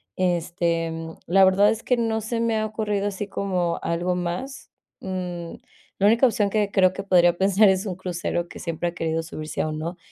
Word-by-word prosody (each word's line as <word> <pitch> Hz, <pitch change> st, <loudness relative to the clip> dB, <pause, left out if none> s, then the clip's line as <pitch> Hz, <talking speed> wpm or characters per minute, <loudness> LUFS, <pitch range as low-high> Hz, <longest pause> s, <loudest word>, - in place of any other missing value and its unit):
Este, 170 Hz, -2 st, 0 dB
mm, 165 Hz, 0 st, -7 dB
la 190 Hz, +3 st, +6 dB
verdad, 195 Hz, +2 st, +5 dB
es 225 Hz, +1 st, -2 dB
que 250 Hz, -, +1 dB
no 225 Hz, -1 st, 0 dB
se 230 Hz, +2 st, -3 dB
me 230 Hz, -1 st, +1 dB
ha 215 Hz, -, 0 dB
ocurrido 210 Hz, -2 st, -2 dB
así 200 Hz, +1 st, -5 dB
como 180 Hz, -4 st, -1 dB
algo 175 Hz, +2 st, -1 dB
más, 180 Hz, +10 st, -5 dB, 0.3 s
mm, 180 Hz, -3 st, -5 dB, 0.5 s
la 200 Hz, -, +3 dB
única 230 Hz, +5 st, +5 dB
opción 210 Hz, -4 st, 0 dB
que 210 Hz, -1 st, +1 dB
creo 185 Hz, -2 st, +4 dB
que 195 Hz, -, -5 dB
podría 175 Hz, -3 st, +4 dB
pensar 200 Hz, +2 st, +5 dB
es 190 Hz, +2 st, +1 dB
un 185 Hz, -, -3 dB
crucero, 175 Hz, -1 st, -3 dB
que -, -, -11 dB
siempre 170 Hz, 0 st, -2 dB
ha -, -, -10 dB
querido 165 Hz, -1 st, -2 dB
subirse 155 Hz, -1 st, -5 dB
a -, -, -1 dB
uno, 160 Hz, +3 st, -4 dB
185 Hz, 200 wpm, -24 LUFS, 170-205 Hz, 0.5 s, la